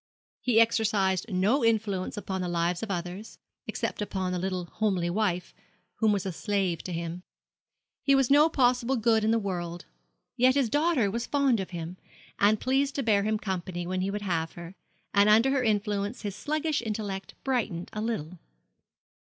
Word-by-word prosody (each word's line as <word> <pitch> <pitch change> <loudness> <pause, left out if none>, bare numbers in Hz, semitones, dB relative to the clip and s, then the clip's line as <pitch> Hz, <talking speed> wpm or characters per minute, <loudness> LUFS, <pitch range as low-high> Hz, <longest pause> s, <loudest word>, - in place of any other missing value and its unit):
He 240 -3 +3
exercised 215 -4 +2
no 205 +9 +2
influence 215 -4 0
upon 190 -2 -3
the 180 - -2
lives 175 0 0
of 225 - -4
others, 180 +3 -5 0.3
except - - -3
upon 190 -3 -2
the 180 - -1
little 185 -1 -2
homely 185 -3 -1
wife, 180 -3 -1 0.4
who 225 - +2
was 205 -2 +2
a 190 - -2
slave 190 -2 -1
to 185 - -4
him. 170 +1 -4 0.8
He 275 - +4
was 270 -1 +2
no 295 +3 +6
possible 250 -2 +2
good 225 -2 +2
in 215 - +2
the 230 - +3
world. 175 -4 -4 0.5
Yet 255 +2 +4
his 265 -6 +1
daughter 290 - +2
was 235 +3 -3
fond 275 -5 +2
of 190 - -4
him, 170 0 -6 0.4
and 210 +1 +4
pleased 275 +2 +1
to 275 - -1
bear 210 -3 +3
him 215 +1 0
company 185 -4 -4
when 185 +1 -2
he 190 - -1
would 205 +1 -4
have 165 -4 -1
her; 170 +1 -9 0.4
and 200 +1 +5
under 225 +5 +5
her 275 -1 +2
influence 205 -1 -1
his 200 -2 -4
sluggish 305 +6 -1
intellect 205 -4 -4
brightened 220 -10 -2
a 215 - -3
little. 185 -7 -3
205 Hz, 175 wpm, -28 LUFS, 185-235 Hz, 0.8 s, no